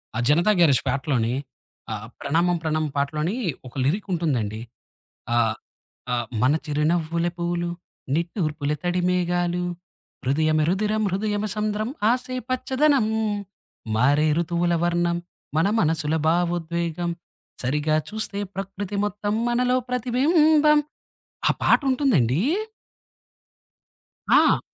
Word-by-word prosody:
ఆ - - -1
'జనతా 170 +8 +4
గ్యారేజ్' 145 -7 +5
పాటలోని, 135 -5 0 0.6
ఆ - - -1 0.3
'ప్రణామం 170 +4 +1
ప్రణామం' 155 -1 -1
పాటలోని 150 +8 -1 0.3
ఒక 120 - -13
లిరిక్ 195 +10 0
ఉంటుందండి. 125 -11 -1 0.8
ఆహ్, 110 -2 +2 0.6
ఆహ్, 120 -1 0 0.2
మన 130 - +4
చిరునవ్వులే 165 +3 0
పువ్వులు, 175 0 -1 0.5
నిట్టూర్పుల 155 -3 -1
తడి 180 0 0
మేఘాలు, 175 0 0 0.6
హృదయమే 155 +3 +2
రుదిరం 215 +3 0
హృదయమే 205 +1 -1
సంద్రం 215 +1 -1 0.2
ఆశే 255 +1 -2
పచ్చదనం. 265 0 +2 0.9
మారే 145 +7 +3
ఋతువుల 170 +1 0
వర్ణం 175 0 +1 0.4
మన 165 +4 +3
మనసుల 160 -2 +1
భావోద్వేగం 170 0 0 0.5
సరిగా 150 +4 +1
చూస్తే 210 -1 -4 0.2
ప్రకృతి 195 +1 -5
మొత్తం 205 0 -2
మనలో 250 +1 +2
ప్రతిబింబం. 300 +5 +4 0.7
ఆ - - +5
పాటుంటుందండీ 250 - +3 1.9
ఆ! - - +5
175 Hz, 95 wpm, -24 LUFS, 155-210 Hz, 1.9 s, గ్యారేజ్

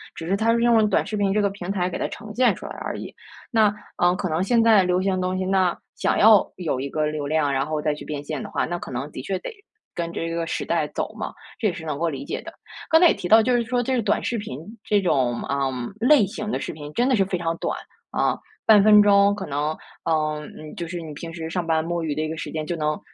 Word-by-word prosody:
只 165 - -7
是 195 - +2
它 230 +2 +2
是 235 - +1
用 235 -1 +5
了 215 -1 +4
短 - - +1
视 215 - -3
频 195 -1 +1
这 210 - +2
个 200 - +2
平 195 -2 -7
台 185 -2 0
给 - - -4
它 - - -1
呈 210 -1 -9
现 250 +2 +3
出 - - -10
来 - - -7
而 - - -4
已。 - - -8 0.4
那 215 -3 +4 0.2
呃， 175 +1 +3
可 185 -1 -3
能 160 +3 0
现 230 +2 +3
在 215 -4 +6
流 180 0 +1
行 190 -1 +1
的 185 - -2
东 185 0 -1
西 185 - -1
那 185 -2 +2 0.2
想 - - 0
要 215 -1 +7
有 160 -8 -2
一 140 +1 -3
个 155 +1 0
流 150 -2 -3
量， 150 -2 +1
然 135 +1 +1
后 155 -1 -2
再 150 -1 +1
去 150 - -9
变 145 -1 -5
现 150 -1 -4
的 - - -7
话， - - -1
那 175 +1 -3
可 - - -8
能 130 +4 -4
的 130 - -6
确 190 +7 -2
得 - - -6 0.4
跟 170 -1 -3
这 165 - -3
个 165 0 -2
时 - - -3
代 160 -3 0
走 - - -4
嘛， - - -5 0.3
这 215 - +1
也 180 - 0
是 165 -2 -8
能 150 -1 -3
够 170 - +1
理 140 -2 -5
解 - - -4
的。 - - -9 0.4
刚 320 +1 +6
才 350 - +8
也 - - +4
提 175 - -5
到， 220 +2 +7
就 250 +1 +2
是 240 - +2
说 245 +1 0
这 260 +2 0
个 - - +1
短 210 - 0
视 235 - -1
频， 140 -11 -6 0.3
这 205 -1 +2
种， 130 -9 +1
呃， 140 -1 0 0.3
类 250 -2 +5
型 210 +2 -5
的 - - -1
视 - - -4
频 150 -1 -9
真 245 +3 +2
的 255 - +4
是 195 -2 +2
非 185 -1 -2
常 165 -1 -2
短， - - -2 0.3
啊， - - +1 0.3
半 210 -2 +7
分 210 -1 +8
钟 200 0 +5
可 190 - -5
能 150 +2 -2 0.3
呃， 155 -1 0 0.2
嗯， 155 0 -9
就 170 - -4
是 175 0 -5
你 155 -2 -8
平 165 +2 -8
时 165 -1 -5
上 175 0 -2
班 160 -1 +2
摸 170 0 -2
鱼 150 -3 -2
的 155 - -1
一 155 - -2
个 160 - -5
时 - - -5
间 155 -1 -3
就 175 - -2
能 150 -1 -1
175 Hz, 310 characters per minute, -23 LUFS, 155-210 Hz, 0.4 s, 才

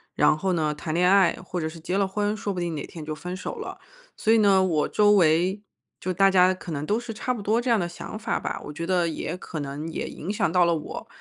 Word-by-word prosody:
然 - - +4
后 185 +3 -1
呢， 155 -3 0
谈 155 +2 -4
恋 180 +1 +4
爱 195 -3 +4
或 180 -1 -3
者 160 - -2
是 165 +1 -11
结 180 +4 -3
了 195 -1 +2
婚， 205 +2 -1
说 205 -1 -3
不 185 - -3
定 170 -2 -2
哪 145 - -4
天 160 -3 -9
就 155 - -3
分 180 +4 -6
手 - - -5
了。 - - -7 0.4
所 220 - +3
以 230 - +5
呢， 195 -2 +5
我 160 -5 +1
周 210 -1 +4
围 185 +1 +3 0.4
就 185 - -2
大 195 +2 +4
家 185 0 +5
可 175 - -9
能 145 -1 -3
都 215 +3 +1
是 240 -2 -6
差 250 +4 -2
不 210 - -6
多 220 +4 +2
这 250 - -2
样 230 -2 +4
的 175 - -1
想 175 +4 -8
法 225 +1 -2
吧， - - -4
我 150 - -7
觉 170 +2 -5
得 180 -2 +2
也 165 +1 -4
可 165 -3 -7
能 145 +2 -5
也 - - -4
影 190 +6 -5
响 200 -6 0
到 180 0 +4
了 170 -1 +2
我。 155 - -6
180 Hz, 295 characters per minute, -25 LUFS, 160-205 Hz, 0.4 s, 以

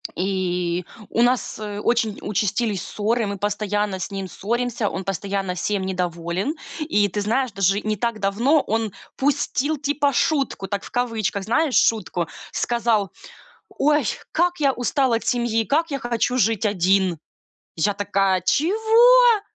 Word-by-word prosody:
И 180 -2 -1 0.2
у 235 - +1
нас 245 -2 0
очень 215 +1 -1
участились 210 0 -1
ссоры, 225 +2 -1
мы 200 -1 -4
постоянно 205 -1 -1
с 185 - -5
ним 195 -1 -4
ссоримся, 235 +2 -2
он 190 - -5
постоянно 195 0 -2
всем 195 +2 -1
недоволен. 180 - -2 0.3
И 210 -10 +2
ты 205 +2 -3
знаешь, 235 +4 0
даже 195 +1 +1
не 215 0 -1
так 230 +1 -2
давно 235 +10 +2
он 225 -2 -1 0.2
пустил 290 +1 0
типа 285 0 0
шутку, 270 -8 0
так 200 0 -3
в - - -11
кавычках, 225 -5 -1
знаешь, 285 +4 +1
шутку. 180 -6 +2 0.2
Сказал: 230 -4 0 0.6
"Ой, 295 -1 +2 0.3
как 350 0 +1
я 280 -2 +3
устал 250 0 +1
от 225 - -1
семьи, 235 -2 +1
как 320 +5 +1
я 275 - -2
хочу 240 +1 -1
жить 220 -1 +2
один". 190 -3 +2 0.6
Я 200 +5 +1
такая: 195 -2 +1
"Чего? 445 - +5
215 Hz, 140 wpm, -22 LUFS, 195-255 Hz, 0.6 s, Чего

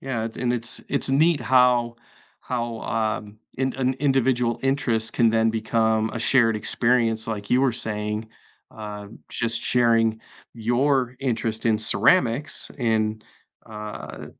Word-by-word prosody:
Yeah, 115 -4 -3
and 120 -1 0
it's 120 -1 -2
it's 140 -1 +1
neat 155 +3 +3
how 125 -2 +3 0.5
how, 120 -2 -4
um, 110 -1 -3 0.2
an 130 0 0
individual 130 -4 +1
interest 120 -5 0
can 115 -2 +3
then 115 0 +2
become 110 0 0
a - - -4
shared 115 -1 +3
experience, 115 0 0
like 105 -2 -4
you 125 - +3
were 135 -1 +3
saying, 105 -1 -3 0.4
uh, 105 -1 -8 0.2
just 115 0 -2
sharing 115 -2 +2 0.3
your 125 +2 +1
interest 115 -4 -2
in 110 -2 +3
ceramics, 115 - +2
and, 110 -3 0 0.4
uh, 105 -1 -8
115 Hz, 125 wpm, -23 LUFS, 110-125 Hz, 0.5 s, neat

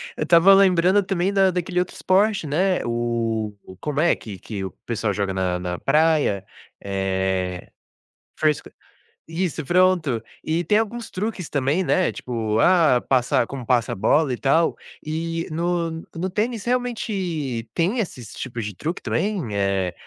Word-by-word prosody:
eu - - -2
estava 175 +3 +6
lembrando 190 0 +5
também 190 0 -1
da 195 -1 +4
daquele 180 0 -1
outro 180 - -2
esporte, 195 -1 +2
né, 180 +4 +1
oh, 115 -2 -1 0.3
como 150 -1 -2
é 170 +2 +4
que 100 -4 -9
que 100 +1 -6
o 95 - -3 0.2
pessoal 110 -3 -1
joga 100 -1 -1
na 90 -1 0
na 90 -1 -4
praia? 150 -10 +2 0.3
Eh, 95 -2 -2 0.7
foi 155 - +3
isso 150 - -3
fresc - - -15 0.6
isso, 170 -2 -2
pronto. 175 -7 +2 0.2
E 165 +2 0
tem 210 - +3
alguns 225 +1 -3
truques 190 -3 -3
também, 145 +6 0
né, 185 - +2
tipo, 110 -3 -2
ah, 165 -8 +5
passar 125 -2 +2
como 135 -3 -7
passa 120 -1 +2
a - - -5
bola 130 +7 +2
e - - -3
tal. 160 +5 +2 0.3
Eh, 165 +2 -3
no 170 +1 -1 0.2
no 180 +3 -2
tênis 215 +3 -2
realmente 190 - -2
tem 190 +9 +1
esses 125 - -5
tipos 120 -3 -5
de 105 -2 -6
truque 165 - -4
também? 190 - -2
Eh, 100 -2 0
155 Hz, 160 wpm, -23 LUFS, 115-185 Hz, 0.7 s, estava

